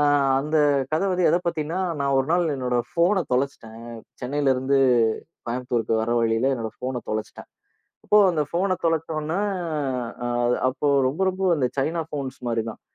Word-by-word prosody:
ஆ - - +4 0.4
அந்த 150 +2 -1 0.4
கதை 160 +6 +1
வந்து 180 -1 +2
எதைப் 175 +1 0
பத்தின்னா, 165 +2 -2 0.2
நான் 140 -1 +1
ஒரு 135 +3 0
நாள் 175 -1 +2
என்னோட 125 -2 -1
ஃபோன 175 +2 +2
தொலைச்சிட்டேன், 125 -4 -2 0.4
சென்னையில 135 +1 +1
இருந்து 135 +2 +1 0.7
கோயம்புத்தூருக்கு 120 -2 -1
வர 115 - -2
வழியில 115 +4 +2
என்னோட 115 -3 -4
ஃபோன 125 -1 -3
தொலைச்சிட்டேன். 110 0 -5 0.6
அப்போ 210 - +4
அந்த 155 -3 +1
ஃபோன 185 +3 +1
தொலைச்சோனே, 165 +1 -1 1.0
அது 120 - +3
அப்போ 140 +3 -1 0.2
ரொம்ப, 150 +8 -5
ரொம்ப 190 +1 -6
அந்த 135 -4 +1
சைனா 165 +5 0
போன்ஸ் 135 -3 -4
மாரிதான். 115 -1 -3
140 Hz, 150 wpm, -24 LUFS, 125-165 Hz, 1.0 s, ஆ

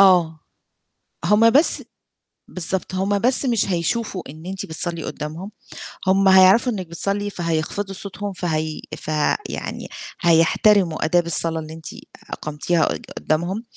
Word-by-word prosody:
آه. 175 -5 +4 0.8
هم 220 +2 +5
بس 290 +7 +4 0.7
بالضبط. 185 +1 -3
هم 200 +2 0
بس 255 +4 +3
مش 235 -5 +2
هيشوفوا 185 +3 -1
إن 155 +3 -11
أنتِ 190 +1 -5
بتصلّي 165 +1 -2
قُدّامهم، 165 +7 -6 0.6
هم 195 +1 +4
هيعرفوا 190 +6 +6
إنِّك 190 -5 -5
بتصلّي 200 +5 -2
فهيخفضوا 175 +2 -3
صوتهم، 200 +1 -6
فهي 160 -4 -3 0.2
ف - - -13 0.4
يعني - - -5 0.3
هيحترموا 170 +1 +3
آداب 175 +2 +2
الصلا 165 0 +1
اللي 155 0 -8
أنتِ 160 -1 -12 0.4
أقمتيها 155 +3 -1
قد - - -4
قُدّامهم، 175 +8 -1
185 Hz, 125 wpm, -21 LUFS, 165-200 Hz, 0.8 s, هيعرفوا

